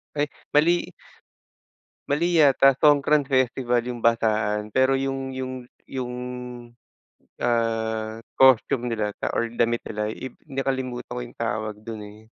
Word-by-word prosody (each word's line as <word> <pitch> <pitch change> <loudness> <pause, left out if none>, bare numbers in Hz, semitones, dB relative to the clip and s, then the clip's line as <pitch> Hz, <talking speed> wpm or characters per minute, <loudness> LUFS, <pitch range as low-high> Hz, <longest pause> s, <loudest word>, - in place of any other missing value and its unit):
Ay 145 0 0 0.2
mali. 170 +4 +3 1.2
Mali 170 +5 +1
yata, 135 -3 +6
Songkran 150 0 +5
festival 130 -2 +1
yung 120 -2 -5
basaan 110 -2 +1
pero 130 +1 +3
yung 135 0 -2
yung 130 0 -4 0.3
yung 125 -2 -4 1.3
ah, 115 -2 -1 0.2
costume 130 -1 +5
nila 110 -3 -1
sa - - -2
or 115 - 0
damit 120 0 0
nila 105 -1 -3
i 130 - -7 0.2
nakalimutan 130 -3 -3
ko 120 - -4
yung - - -15
tawag 110 -2 -2
dun, 110 -1 -6
eh. 105 +1 -13
125 Hz, 125 wpm, -24 LUFS, 115-135 Hz, 1.3 s, yata